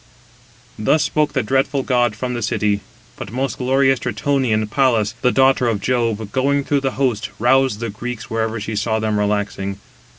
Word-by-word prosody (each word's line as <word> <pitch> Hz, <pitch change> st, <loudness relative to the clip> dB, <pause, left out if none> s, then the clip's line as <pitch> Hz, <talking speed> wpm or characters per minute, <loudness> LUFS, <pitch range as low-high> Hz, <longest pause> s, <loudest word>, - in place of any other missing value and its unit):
Thus 125 Hz, +8 st, +3 dB
spoke 150 Hz, -2 st, 0 dB
the 130 Hz, -3 st, 0 dB
dreadful 135 Hz, +4 st, +1 dB
god 120 Hz, -4 st, +1 dB
from 125 Hz, +3 st, -3 dB
the 120 Hz, -, -3 dB
city. 105 Hz, -2 st, 0 dB, 0.4 s
But -, -, -7 dB
most 130 Hz, +3 st, -2 dB
glorious 135 Hz, 0 st, +2 dB
Tritonian 125 Hz, -4 st, 0 dB
Pallas, 110 Hz, -2 st, +1 dB
the 125 Hz, -, +3 dB
daughter 130 Hz, -1 st, +3 dB
of 110 Hz, -3 st, 0 dB
Jove, 115 Hz, -2 st, -1 dB
going 140 Hz, +2 st, +1 dB
through 140 Hz, 0 st, 0 dB
the 135 Hz, -1 st, -1 dB
host, 125 Hz, -6 st, 0 dB
roused 125 Hz, -1 st, +2 dB
the 115 Hz, -2 st, -3 dB
Greeks 120 Hz, +2 st, -6 dB
wherever 115 Hz, 0 st, -2 dB
she 110 Hz, +1 st, -4 dB
saw 110 Hz, +1 st, 0 dB
them 110 Hz, -1 st, 0 dB
relaxing. 100 Hz, -1 st, -1 dB
120 Hz, 170 wpm, -19 LUFS, 110-135 Hz, 0.4 s, Thus